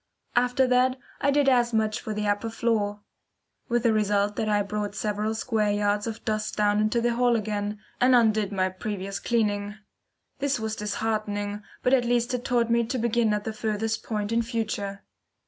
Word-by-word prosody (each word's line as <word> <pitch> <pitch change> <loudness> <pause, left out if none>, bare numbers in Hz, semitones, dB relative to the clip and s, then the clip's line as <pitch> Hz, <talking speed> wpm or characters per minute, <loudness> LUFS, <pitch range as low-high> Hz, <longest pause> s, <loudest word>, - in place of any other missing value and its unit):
After 250 +2 +3
that 255 +1 +3 0.2
I 280 - +3
did 285 0 +3
as 240 -3 +3
much 215 -1 +1
for 220 - -5
the 210 0 -2
upper 205 +2 0
floor, 215 -3 -1 0.7
with 240 -1 +1
the 230 -2 +4
result 205 -1 +1
that 215 - 0
I 205 -1 +2
brought 205 0 -3
several 210 +1 -1
square 220 -2 0
yards 205 +1 +1
of 225 0 -6
dust 215 -2 -1
down 205 0 +3
into 215 +2 +2
the 240 0 +1
hall 240 0 +3
again, 210 -1 -2 0.2
and 250 +1 +5
undid 215 -4 +3
my 185 -1 +1
previous 195 +1 -5
cleaning. 205 -3 0 0.6
This 280 -2 0
was 220 0 -2
disheartening, 210 -1 -2 0.2
but 250 - +3
at 250 -2 +4
least 240 +1 +1
it 245 -1 -2
taught 235 -2 +1
me 235 0 +3
to 255 +3 -2
begin 235 -1 +2
at 210 0 0
the 220 - -4
furthest 220 0 -2
point 210 -1 -3
in 230 0 +2
future. 215 -4 -3
215 Hz, 185 wpm, -26 LUFS, 205-235 Hz, 0.7 s, and